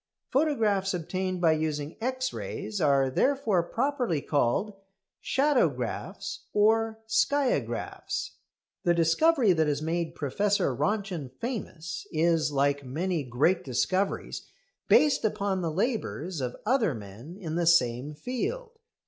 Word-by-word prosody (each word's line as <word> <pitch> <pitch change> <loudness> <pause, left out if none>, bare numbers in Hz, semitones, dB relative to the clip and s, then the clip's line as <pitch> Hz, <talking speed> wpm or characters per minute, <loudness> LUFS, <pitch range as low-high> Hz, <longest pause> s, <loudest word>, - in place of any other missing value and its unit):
Photographs 215 -10 +2
obtained 185 +2 -2
by 165 -2 +5
using 155 -1 -2
X 260 +2 -1
rays 205 -4 -5
are 140 -3 +3
therefore 255 - +2
properly 245 - -1
called 145 - 0 0.5
shadowgraphs 280 -1 0
or 220 +1 +3
skiagraphs. 265 +5 0 0.5
The 175 -3 +3
discovery 215 - +4
that 160 -2 +2
has 145 0 -1
made 165 +1 -2
Professor 200 +9 0
Röntgen 195 -9 -1
famous 205 -9 -5
is, 160 -1 +2
like 140 0 +1
many 160 +5 -2
great 135 +9 +1
discoveries, 185 +10 -1 0.4
based 300 -2 +4
upon 200 -3 0
the 170 - -1
labours 185 - -2
of 125 -1 -3
other 225 - +2
men 110 - -10
in 165 -6 -5
the 170 0 0
same 135 -3 +3
field. 450 - -4
180 Hz, 115 wpm, -28 LUFS, 155-225 Hz, 0.5 s, by